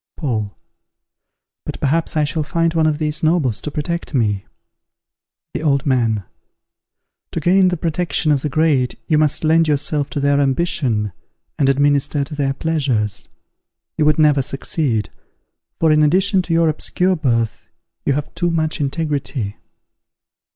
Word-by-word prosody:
Paul. 110 - -3 1.1
But - - -6
perhaps 160 +3 0
I 155 - +3
shall 155 +2 -1
find 165 +2 0
one 160 -1 +2
of 150 -1 +1
these 150 0 -1
nobles 155 - +1
to - - -4
protect 160 +2 -4
me. 105 -6 0 1.1
The - - -3
Old 140 -3 +1
Man. 115 -6 +1 1.1
To - - -1
gain 185 +4 +4
the 180 -1 0
protection 165 -1 0
of 140 -2 +2
the 150 - -2
great 145 -4 +1
you 155 -3 +2
must 155 0 +1
lend 160 +1 +4
yourself 145 -1 0
to - - -3
their 140 0 +2
ambition, 135 - 0 0.5
and 135 -2 +3
administer 145 +1 +2
to 145 +3 -8
their 140 -2 -1
pleasures. 135 -11 -1 0.7
You 155 - +1
would 150 -1 +3
never 150 -3 +4
succeed; 135 - -2 0.7
for, 160 - +3
in 155 0 +4
addition 185 +5 +3
to 175 -2 -3
your 165 0 +3
obscure 180 +4 0
birth, 115 - -1 0.4
you 140 - +1
have 150 +2 -4
too 175 +1 0
much 160 -1 -1
integrity. 140 -7 -2
150 Hz, 150 wpm, -19 LUFS, 135-160 Hz, 1.1 s, gain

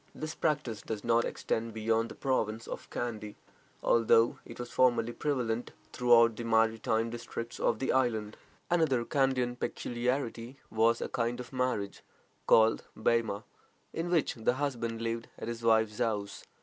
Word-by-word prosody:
This 155 +1 -5
practice 145 -11 -1
does 110 -2 -5
not 115 0 +3
extend 115 0 -3
beyond 115 +1 +1
the - - -9
province 115 -4 -1
of - - -7
Kandy, 110 -3 -4 0.5
although 115 0 +4
it - - -10
was 120 0 -6
formerly 120 -2 +3
prevalent 120 -5 -2 0.2
throughout 115 -2 +5
the 120 - -5
maritime 115 0 +2
districts 115 0 -6
of 115 - +2
the 130 - 0
island. 110 -5 0 0.4
Another 145 -9 +2
Kandian 130 -3 +1
peculiarity 120 0 -2
was 115 +1 +3
a - - -1
kind 120 +1 -2
of 125 +2 -8
marriage 125 -6 -1 0.5
called 110 0 +5 0.2
"Bema," 110 -2 +1 0.5
in 165 +1 -2
which 170 -4 +2
the 115 0 0
husband 115 -5 -2
lived 115 0 -2
at - - -6
his 115 0 -4
wife's 110 -2 +2
house. 105 -3 -2
115 Hz, 150 wpm, -31 LUFS, 110-125 Hz, 0.5 s, throughout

